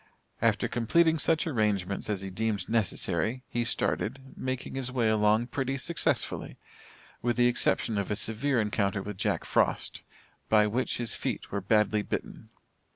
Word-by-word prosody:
After -, -, +2 dB
completing 160 Hz, +7 st, +2 dB
such 160 Hz, +3 st, +2 dB
arrangements 105 Hz, -, 0 dB
as 100 Hz, -3 st, -1 dB
he 95 Hz, 0 st, -6 dB
deemed 110 Hz, +1 st, -2 dB
necessary, 110 Hz, +2 st, 0 dB
he 120 Hz, -, -1 dB
started, 135 Hz, +3 st, -2 dB
making 130 Hz, 0 st, -4 dB
his 130 Hz, -2 st, -2 dB
way 120 Hz, -3 st, +1 dB
along 110 Hz, +1 st, +3 dB
pretty 135 Hz, +1 st, -2 dB
successfully, 170 Hz, +5 st, -2 dB, 0.6 s
with 120 Hz, 0 st, 0 dB
the 120 Hz, -, +5 dB
exception 120 Hz, -3 st, +2 dB
of 100 Hz, -, -3 dB
a 105 Hz, -, 0 dB
severe 115 Hz, +5 st, +1 dB
encounter 100 Hz, -2 st, 0 dB
with 105 Hz, -1 st, -6 dB
Jack -, -, 0 dB
Frost, -, -, 0 dB, 0.5 s
by 105 Hz, -1 st, +5 dB
which 115 Hz, +5 st, -1 dB
his 120 Hz, -2 st, 0 dB
feet -, -, -3 dB
were 100 Hz, -, -2 dB
badly 105 Hz, +1 st, +2 dB
bitten. -, -, -5 dB
115 Hz, 155 wpm, -29 LUFS, 105-130 Hz, 0.6 s, the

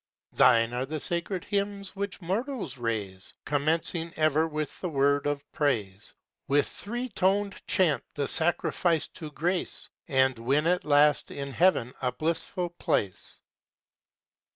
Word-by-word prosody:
Thine 115 Hz, -1 st, +5 dB
are 125 Hz, +2 st, -2 dB
the 155 Hz, +2 st, -3 dB
sacred 175 Hz, +3 st, -2 dB
hymns 200 Hz, -1 st, -2 dB
which 200 Hz, -1 st, -4 dB
mortals 195 Hz, -, -3 dB
raise, 105 Hz, -5 st, -4 dB
Commencing 160 Hz, +3 st, 0 dB
ever 155 Hz, 0 st, +3 dB
with 155 Hz, -2 st, -4 dB
the 180 Hz, -, -2 dB
word 140 Hz, -1 st, +2 dB
of 145 Hz, -1 st, -1 dB
praise, 105 Hz, -10 st, -1 dB, 0.3 s
With 145 Hz, +2 st, +3 dB
three 240 Hz, +4 st, -4 dB
toned 200 Hz, 0 st, +1 dB
chant 180 Hz, -7 st, +3 dB
the 140 Hz, -2 st, -1 dB
sacrifice 165 Hz, 0 st, +1 dB
to 155 Hz, -4 st, -8 dB
grace, 175 Hz, +4 st, -2 dB, 0.2 s
And 130 Hz, -3 st, +2 dB
win 140 Hz, +6 st, +1 dB
at 180 Hz, -1 st, +2 dB
last 150 Hz, 0 st, +4 dB
in 140 Hz, -1 st, -5 dB
heaven 135 Hz, -7 st, +2 dB
a 125 Hz, -1 st, +1 dB
blissful 165 Hz, +6 st, -2 dB
place. 105 Hz, -, -2 dB
155 Hz, 130 wpm, -28 LUFS, 135-180 Hz, 0.3 s, Thine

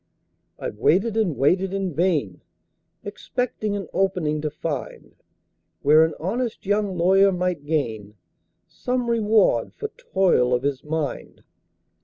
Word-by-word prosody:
"I've 105 Hz, -, -6 dB
waited 200 Hz, -, +2 dB
and 205 Hz, -10 st, 0 dB
waited 185 Hz, +7 st, +2 dB
in 190 Hz, -3 st, -2 dB
vain, 150 Hz, -, 0 dB, 0.6 s
Expecting 215 Hz, 0 st, -3 dB
an 200 Hz, -, -5 dB
'opening' 180 Hz, -6 st, 0 dB
to 155 Hz, -, -2 dB
find, 150 Hz, -2 st, -6 dB, 0.7 s
Where 155 Hz, +3 st, +6 dB
an 160 Hz, -, 0 dB
honest 225 Hz, +8 st, -3 dB
young 205 Hz, -2 st, 0 dB
lawyer 195 Hz, +3 st, +4 dB
might 180 Hz, -5 st, -2 dB
gain 110 Hz, -9 st, -2 dB, 0.5 s
Some 250 Hz, -1 st, -2 dB
reward 220 Hz, -2 st, +2 dB
for 435 Hz, -3 st, -5 dB
toil 190 Hz, -, +1 dB
of 125 Hz, -, -3 dB
his 140 Hz, -2 st, -2 dB
mind. 150 Hz, -2 st, -4 dB
180 Hz, 125 wpm, -23 LUFS, 150-205 Hz, 0.7 s, Where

